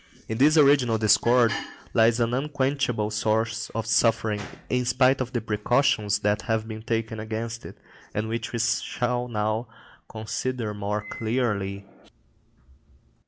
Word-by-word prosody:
In 110 Hz, +1 st, -4 dB
this 150 Hz, +4 st, +5 dB
original 140 Hz, -6 st, +5 dB
discord 110 Hz, +2 st, +4 dB, 0.4 s
lies 115 Hz, +1 st, +4 dB
an 115 Hz, 0 st, +1 dB
unquenchable 130 Hz, -5 st, -1 dB
source 110 Hz, +1 st, 0 dB
of 115 Hz, -1 st, -2 dB
suffering, 110 Hz, -1 st, +2 dB, 0.3 s
in 125 Hz, 0 st, 0 dB
spite 130 Hz, +2 st, +3 dB
of 125 Hz, -1 st, -3 dB
the 120 Hz, -3 st, -2 dB
precautions 105 Hz, -1 st, +1 dB
that 105 Hz, +1 st, +1 dB
have 110 Hz, -1 st, -1 dB
been 110 Hz, -1 st, -7 dB
taken 110 Hz, -1 st, -2 dB
against 115 Hz, +1 st, -5 dB
it, -, -, -12 dB, 0.3 s
and 110 Hz, +1 st, -2 dB
which 115 Hz, 0 st, -3 dB
we 120 Hz, -, -3 dB
shall 120 Hz, +1 st, -1 dB
now 110 Hz, +1 st, -1 dB, 0.4 s
consider 110 Hz, +1 st, -3 dB
more 105 Hz, +1 st, -2 dB
closely. 105 Hz, -5 st, -2 dB
115 Hz, 130 wpm, -25 LUFS, 110-125 Hz, 0.4 s, this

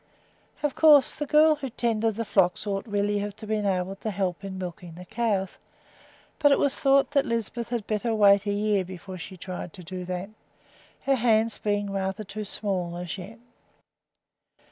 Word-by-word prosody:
Of 295 Hz, -2 st, +1 dB
course 295 Hz, -4 st, +6 dB
the 295 Hz, -, -4 dB
girl 305 Hz, +1 st, +5 dB
who 270 Hz, -2 st, -5 dB
tended 225 Hz, -2 st, 0 dB
the 230 Hz, +1 st, -3 dB
flocks 190 Hz, -2 st, +2 dB
ought 200 Hz, +2 st, -3 dB
really 205 Hz, 0 st, 0 dB
to 215 Hz, +2 st, -11 dB
be 215 Hz, 0 st, 0 dB
able 195 Hz, -2 st, -1 dB
to 220 Hz, -, -4 dB
help 190 Hz, -2 st, -2 dB
in 195 Hz, -1 st, -6 dB
milking 175 Hz, -2 st, -7 dB
the 180 Hz, +1 st, -10 dB
cows; 215 Hz, -3 st, -1 dB, 0.8 s
but 290 Hz, -1 st, +5 dB
it 280 Hz, -, +5 dB
was 280 Hz, -1 st, 0 dB
thought 275 Hz, 0 st, +4 dB
that 280 Hz, -2 st, +3 dB
Lisbeth 230 Hz, +1 st, -2 dB
had 235 Hz, -4 st, -2 dB
better 220 Hz, +2 st, -1 dB
wait 200 Hz, -1 st, +5 dB
a -, -, +2 dB
year 205 Hz, -1 st, +1 dB
before 185 Hz, +1 st, -9 dB
she 185 Hz, +2 st, -8 dB
tried 180 Hz, -1 st, -6 dB
to 180 Hz, -, -11 dB
do 180 Hz, +1 st, -6 dB
that, 180 Hz, +3 st, -4 dB, 0.7 s
her 275 Hz, -, +2 dB
hands 225 Hz, -2 st, +2 dB
being 205 Hz, -1 st, -1 dB
rather 195 Hz, +1 st, -2 dB
too 210 Hz, +1 st, -6 dB
small 185 Hz, -4 st, -3 dB
as 175 Hz, -1 st, -4 dB
yet. 200 Hz, +6 st, -9 dB
205 Hz, 180 wpm, -26 LUFS, 190-230 Hz, 0.8 s, course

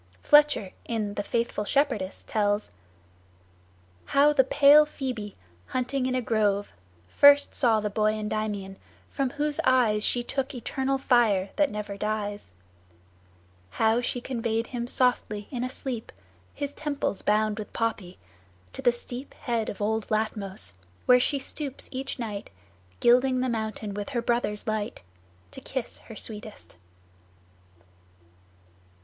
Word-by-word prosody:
Fletcher, 295 Hz, -10 st, +5 dB
in 215 Hz, -3 st, -2 dB
the 205 Hz, -, -2 dB
"Faithful 230 Hz, 0 st, -1 dB
Shepherdess," 210 Hz, -6 st, 0 dB
tells: 205 Hz, -1 st, 0 dB, 1.3 s
"How 285 Hz, +2 st, +4 dB
the 265 Hz, -, +5 dB
pale 285 Hz, +3 st, +7 dB
Phoebe, 255 Hz, -8 st, -5 dB, 0.3 s
hunting 255 Hz, +1 st, -1 dB
in 255 Hz, -, -1 dB
a 255 Hz, -, 0 dB
grove, 205 Hz, -3 st, +1 dB, 0.4 s
First 285 Hz, -, +6 dB
saw 230 Hz, -4 st, +3 dB
the 210 Hz, 0 st, -2 dB
boy 215 Hz, +1 st, +2 dB
Endymion, 210 Hz, -2 st, -3 dB, 0.3 s
from 270 Hz, -2 st, 0 dB
whose 295 Hz, +2 st, -2 dB
eyes 230 Hz, -5 st, +3 dB
She 240 Hz, +2 st, +2 dB
took 270 Hz, +2 st, -3 dB
eternal 265 Hz, +3 st, -1 dB
fire 225 Hz, -8 st, +2 dB
that 295 Hz, -2 st, +3 dB
never 210 Hz, -2 st, -5 dB
dies; 205 Hz, -, -3 dB, 1.2 s
How 225 Hz, -, +2 dB
she 245 Hz, 0 st, -2 dB
conveyed 230 Hz, -3 st, -1 dB
him 240 Hz, -1 st, -4 dB
softly 245 Hz, -5 st, 0 dB
in 245 Hz, -3 st, -3 dB
a 255 Hz, -, -2 dB
sleep, 255 Hz, -3 st, -5 dB, 0.4 s
His 285 Hz, 0 st, -4 dB
temples 285 Hz, -9 st, -2 dB
bound 215 Hz, 0 st, +1 dB
with 215 Hz, -, -7 dB
poppy, 215 Hz, -5 st, -2 dB, 0.6 s
to -, -, -6 dB
the 245 Hz, -, +5 dB
steep 245 Hz, +2 st, -7 dB
Head 235 Hz, -4 st, -2 dB
of 205 Hz, -, -5 dB
old 220 Hz, +1 st, 0 dB
Latmos, 200 Hz, -, -1 dB, 0.3 s
where 250 Hz, 0 st, +7 dB
she 280 Hz, +3 st, +1 dB
stoops 275 Hz, 0 st, -4 dB
each 270 Hz, +2 st, -4 dB
night, 215 Hz, -5 st, -5 dB, 0.5 s
Gilding 255 Hz, +2 st, +4 dB
the 255 Hz, -, 0 dB
mountain 220 Hz, -2 st, -3 dB
with 205 Hz, 0 st, -5 dB
her 245 Hz, -4 st, -1 dB
brother's 235 Hz, -3 st, -1 dB
light, 215 Hz, -, -3 dB, 0.5 s
To 265 Hz, -, -9 dB
kiss 260 Hz, -2 st, -5 dB
her 225 Hz, -, -12 dB
sweetest." 210 Hz, -, -8 dB
230 Hz, 135 wpm, -27 LUFS, 210-260 Hz, 1.3 s, pale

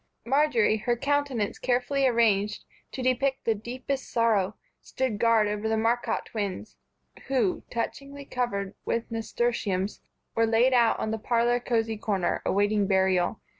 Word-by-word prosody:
Marjory, 250 Hz, -5 st, +3 dB
her 240 Hz, +3 st, -1 dB
countenance 280 Hz, -5 st, -1 dB
carefully 260 Hz, +2 st, +1 dB
arranged 210 Hz, -4 st, +2 dB, 0.3 s
to 260 Hz, -, -5 dB
depict 265 Hz, +1 st, 0 dB
the 225 Hz, -, +3 dB
deepest 255 Hz, +5 st, -5 dB
sorrow, 220 Hz, -4 st, +1 dB, 0.3 s
stood 255 Hz, -6 st, -3 dB
guard 230 Hz, -2 st, +4 dB
over 210 Hz, +1 st, -2 dB
the 220 Hz, -, +1 dB
Marcotte 230 Hz, +2 st, 0 dB
twins, 205 Hz, -1 st, -5 dB, 0.5 s
who, 245 Hz, -9 st, +1 dB
touchingly 275 Hz, +4 st, -5 dB
covered 200 Hz, -7 st, -2 dB
with 230 Hz, 0 st, -2 dB
nasturtiums, 225 Hz, -4 st, -1 dB, 0.3 s
were 230 Hz, 0 st, +2 dB
laid 235 Hz, +4 st, +3 dB
out 235 Hz, -2 st, +4 dB
on 215 Hz, -, -2 dB
the 220 Hz, -, -2 dB
parlor 240 Hz, +2 st, +1 dB
cozy 225 Hz, -2 st, -1 dB
corner, 195 Hz, -4 st, -1 dB
awaiting 205 Hz, 0 st, +2 dB
burial. 190 Hz, 0 st, +1 dB
230 Hz, 135 wpm, -27 LUFS, 210-250 Hz, 0.5 s, guard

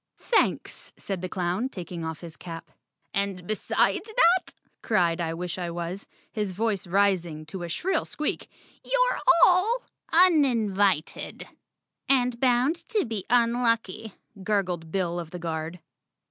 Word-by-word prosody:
"Thanks!" 470 Hz, -, 0 dB
said 195 Hz, -3 st, -4 dB
the 185 Hz, -, -4 dB
clown, 185 Hz, +8 st, -1 dB
taking 175 Hz, -5 st, -7 dB
off 160 Hz, -1 st, -5 dB
his 170 Hz, -2 st, -9 dB
cap. 165 Hz, -2 st, -9 dB, 0.4 s
"And 200 Hz, -3 st, -2 dB
besides 215 Hz, -, +1 dB
that," 355 Hz, +2 st, +4 dB, 0.3 s
cried 175 Hz, -6 st, +1 dB
I 165 Hz, -1 st, -2 dB
wish 180 Hz, +1 st, -4 dB
I 175 Hz, -1 st, -3 dB
was, 175 Hz, +3 st, -5 dB, 0.2 s
his 210 Hz, -4 st, -2 dB
voice 205 Hz, -1 st, -1 dB
ris¬ 195 Hz, -1 st, +3 dB
ing 155 Hz, -2 st, -8 dB
to 175 Hz, +4 st, -7 dB
a 175 Hz, -, -5 dB
shrill 375 Hz, -, 0 dB
squeak, 300 Hz, -, -3 dB, 0.3 s
"you're -, -, +1 dB, 0.3 s
all 425 Hz, +7 st, +3 dB, 0.3 s
uninvited." 230 Hz, -, +2 dB, 0.6 s
"And 250 Hz, -3 st, +2 dB
bound 255 Hz, +5 st, +3 dB
to 430 Hz, -6 st, +1 dB
be 220 Hz, -5 st, -4 dB
unlucky," 230 Hz, -3 st, +1 dB, 0.3 s
gurgled 185 Hz, -5 st, -1 dB
Bill 175 Hz, -2 st, -1 dB
of 170 Hz, -2 st, -6 dB
the 180 Hz, -, -7 dB
Guard. 165 Hz, 0 st, -4 dB
195 Hz, 135 wpm, -26 LUFS, 175-245 Hz, 0.6 s, that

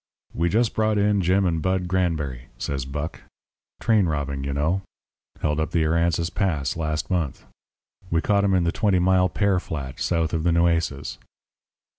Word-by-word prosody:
"We 85 Hz, +1 st, +1 dB
just 115 Hz, +4 st, +2 dB
brought 110 Hz, -1 st, +1 dB
in 105 Hz, -1 st, +3 dB
Jim 95 Hz, +2 st, +2 dB
and 80 Hz, -3 st, 0 dB
Bud 95 Hz, 0 st, 0 dB
Granberry," 80 Hz, -9 st, -1 dB
said 70 Hz, -1 st, -4 dB
Buck. 75 Hz, +3 st, -4 dB, 0.6 s
"Train 110 Hz, -5 st, +3 dB
robbing, 70 Hz, -3 st, -2 dB
you 70 Hz, -, -2 dB
know. 80 Hz, +7 st, 0 dB, 0.6 s
Held 75 Hz, 0 st, 0 dB
up 80 Hz, -1 st, 0 dB
the 80 Hz, -1 st, +1 dB
Aransas 85 Hz, +1 st, +1 dB
Pass 85 Hz, -9 st, 0 dB
last 75 Hz, 0 st, -2 dB
month. 85 Hz, -7 st, -1 dB, 0.6 s
We 85 Hz, -, +2 dB
caught 100 Hz, +3 st, +2 dB
'em 95 Hz, -1 st, +3 dB
in 90 Hz, -, +3 dB
the 85 Hz, -, +1 dB
Twenty 100 Hz, -2 st, +2 dB
Mile 90 Hz, 0 st, +3 dB
pear 100 Hz, 0 st, +1 dB
flat, 70 Hz, -7 st, -6 dB
south 80 Hz, -2 st, 0 dB
of 80 Hz, -, 0 dB
the 85 Hz, +2 st, +2 dB
Nueces." 85 Hz, -4 st, 0 dB
85 Hz, 170 wpm, -24 LUFS, 75-95 Hz, 0.6 s, in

